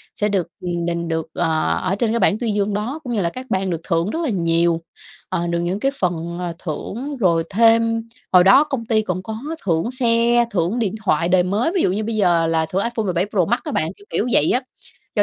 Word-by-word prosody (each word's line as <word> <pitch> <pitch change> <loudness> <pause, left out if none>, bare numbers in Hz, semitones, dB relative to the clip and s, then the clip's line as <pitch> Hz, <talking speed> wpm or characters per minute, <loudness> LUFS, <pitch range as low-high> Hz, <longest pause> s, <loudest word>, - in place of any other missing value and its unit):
sẽ 210 - 0
được, 190 -5 0
ừm, 175 -1 -2
đình 170 0 -2
được, 160 -1 -2
ờ, 160 -2 0
ở 185 - 0
trên 220 +1 0
cái 235 - +1
bảng 210 - +3
tuyên 225 -4 -1
dương 205 0 0
đó, 230 +10 -3
cũng 245 -3 -4
như 210 - 0
là 170 - +1
các 255 +8 -8
bạn 190 0 0
được 170 -2 -3
thưởng 165 +3 0
rất 320 - -3
là 310 - 0
nhiều, 170 -3 +1 0.5
ờ, 175 - -1
được 170 0 -1
những 180 +3 -2
cái 270 +5 +1
phần, 170 -1 -2
ờ, 175 -1 -3
thưởng, 240 - -5
rồi 170 -7 +2
thêm 230 +2 +3 0.3
hồi 180 -1 +7
đó 195 +10 +7
công 270 -6 -4
ty 220 -1 +2
cũng 185 -3 -3
có 220 +2 -5 0.3
thưởng 170 +5 0
xe, 240 -1 +2
thưởng 185 +4 0
điện 215 -4 0
thoại 170 -2 +2
đời 180 -1 +4
mới. 210 - 0
Ví 360 - +3
dụ - - +2
như 210 +3 -1
bây 225 +1 -3
giờ 175 -5 +3
là 160 0 +1
thưởng 195 +2 0
iPhone 235 -1 -2
17 180 0 +1
Pro 190 -5 +1
Max 240 +6 +1
á 305 - -4
bạn, 160 - 0
kiểu 205 - -15
kiểu 225 - 0
vậy 150 - +4
á, 250 - +2 0.5
cho - - +4
195 Hz, 250 wpm, -20 LUFS, 170-230 Hz, 0.5 s, hồi